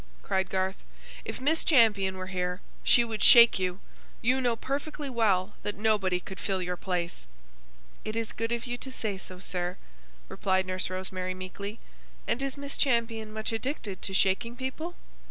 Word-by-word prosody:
cried 190 -1 0
Garth. 190 0 -1 0.4
"If - - -5
Miss 305 +5 +2
Champion 205 - +4
were 185 - -4
here, 180 -1 -2 0.2
she 240 - +6
would 225 -2 -3
shake 235 -4 +9
you! 185 0 -1 0.4
You, 255 +3 +3
know 240 -2 +2
perfectly 285 +3 -4
well 210 -4 +2
that 205 - -3
nobody 205 -4 +2
could 190 +1 -9
fill 190 -1 -1
your 180 0 -2
place!" 175 - -3 0.8
"It 215 - -4
is 230 -1 -1
good 230 +1 -3
of 235 0 -1
you 245 -1 -4
to 265 - -6
say 210 -6 -3
so, 185 -1 -6
sir," 180 -1 -3 0.5
replied 190 - +1
Nurse 185 0 -1
Rosemary, 185 0 -3
meekly. 200 +3 -6 0.5
"And 245 - 0
is 275 0 -2
Miss 280 0 -3
Champion 230 -4 +1
much 220 +1 -3
addicted 225 -4 -3
to - - -3
shaking 190 +5 +2
people?" 265 +7 -4
210 Hz, 170 wpm, -29 LUFS, 185-235 Hz, 0.8 s, shake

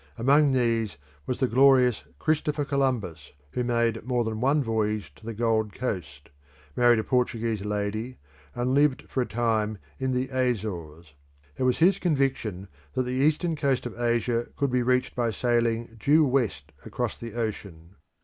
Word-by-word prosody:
Among 140 +5 +4
these 115 - 0 0.3
was 125 - -2
the 130 - +2
glorious 130 -1 +4
Christopher 150 -1 0
Columbus, 125 - -2 0.2
who 125 - -1
made 115 -2 0
more 120 0 0
than 110 -1 -4
one 140 +3 +3
voyage 105 - -1
to 110 - -18
the 115 - -3
Gold 110 -2 0
Coast, 75 - -5 0.4
married 120 -1 +5
a 110 - 0
Portuguese 115 -4 0
lady, 105 +4 -3 0.4
and 125 +1 0
lived 145 -1 +3
for 130 - -1
some 125 - -2
time 110 -2 0 0.2
in 130 0 -1
the 130 +1 -1
Azores. 95 - -3 0.4
It - - -8
was 125 - +2
his 185 +4 +4
conviction 135 - -1 0.3
that 130 - +1
the 125 - -4
eastern 155 +6 +1
coast 140 -4 0
of 120 - -5
Asia 120 0 0
could 140 -2 0
be 125 0 +2
reached 125 +1 +1
by 120 -2 +1
sailing 115 0 0
due 150 +6 +4
west 100 - -1
across - - -3
the 115 0 -9
ocean. 100 -7 -5
120 Hz, 160 wpm, -26 LUFS, 110-130 Hz, 0.4 s, married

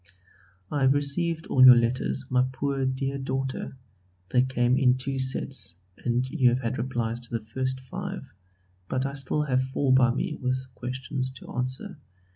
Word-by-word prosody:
I 145 - -1
have 135 +1 +4
received 160 +3 +1
all 130 - +4
your 130 -1 +11
letters, 120 +3 0
my 125 -1 +3
poor 135 0 -1
dear 135 +1 -2
daughter; 135 0 -3 0.5
they 125 - +4
came 125 -1 +2
in 130 -1 +4
two 135 +1 -3
sets 130 -6 -2 0.2
and 125 +1 -1
you 130 -1 +3
have 125 +2 0
had 115 +1 -2
replies 120 -2 -2
to 120 -1 -4
the 110 - -12
first 130 +3 -2
five, 185 +5 -6 0.6
but 130 +1 0
I 140 - -3
still 140 +2 -1
have 130 -3 +1
four 130 +1 +1
by 125 -2 +5
me 125 - -3
with 130 0 -2
questions 130 +1 -3
to 130 - -11
answer. 130 - -4
130 Hz, 170 wpm, -27 LUFS, 125-135 Hz, 0.6 s, your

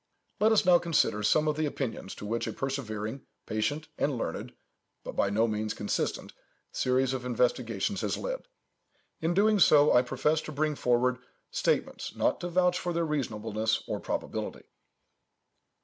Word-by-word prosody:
Let 215 +1 +4
us 215 -3 +4
now 180 -1 +6
consider 160 -10 +1
some 150 +9 +3
of 150 -1 0
the 155 -1 +1
opinions 120 -8 -4
to - - -8
which 115 +3 -2
a - - -3
persevering, 125 -3 -4 0.2
patient, 145 +9 -2
and 140 -3 +1
learned—but - - -8
by 100 - +2
no 110 +3 +2
means 110 -1 -2
consistent—series 130 +1 -2
of 130 -1 -3
investigations 125 - 0
has - - -1
led. - - -4 0.7
In 165 +2 0
doing 210 +1 +4
so, 150 -4 +6
I 125 - +7
profess 150 +5 0
to - - -7
bring 155 +1 0
forward 125 -1 +1 0.3
statements, - - -1
not - - +1
to 175 - -4
vouch 180 0 +2
for 175 - -2
their 170 0 0
reasonableness 110 -7 -1
or - - -2
probability. - - -4
135 Hz, 150 wpm, -29 LUFS, 115-160 Hz, 0.7 s, I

